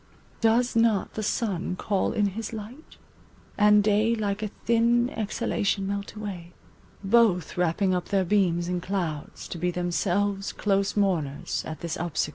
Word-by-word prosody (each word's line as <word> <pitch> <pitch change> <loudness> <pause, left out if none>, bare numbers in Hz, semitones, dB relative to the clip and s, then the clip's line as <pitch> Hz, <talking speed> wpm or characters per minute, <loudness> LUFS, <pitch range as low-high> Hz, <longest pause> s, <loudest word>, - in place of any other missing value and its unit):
Does 235 +2 +2
not 225 -3 +2
the 220 - -3
sun 195 -4 -1
call 195 +1 0
in 205 -1 +1
his 215 +3 -6
light? 225 +8 -9 0.6
and 210 0 +5
day 215 +2 +3
Like 205 -2 -2
a 215 - -1 0.2
thin 235 +2 +3
exhalation 215 -2 -1
melt 200 +1 -4
away— 185 -5 -7 0.5
Both 195 -5 +3
wrapping 180 +2 +1
up 180 -1 -1
their 195 -2 +1
beams 175 -3 +2
in 180 0 -2
clouds 170 -6 -4
to 170 - -6
be 180 +2 0
Themselves 195 +3 -1
close 200 0 0
mourners 165 -9 0
at 160 - -7
this 170 -1 -3
obsequ 170 -3 -1
200 Hz, 150 wpm, -26 LUFS, 180-215 Hz, 0.6 s, and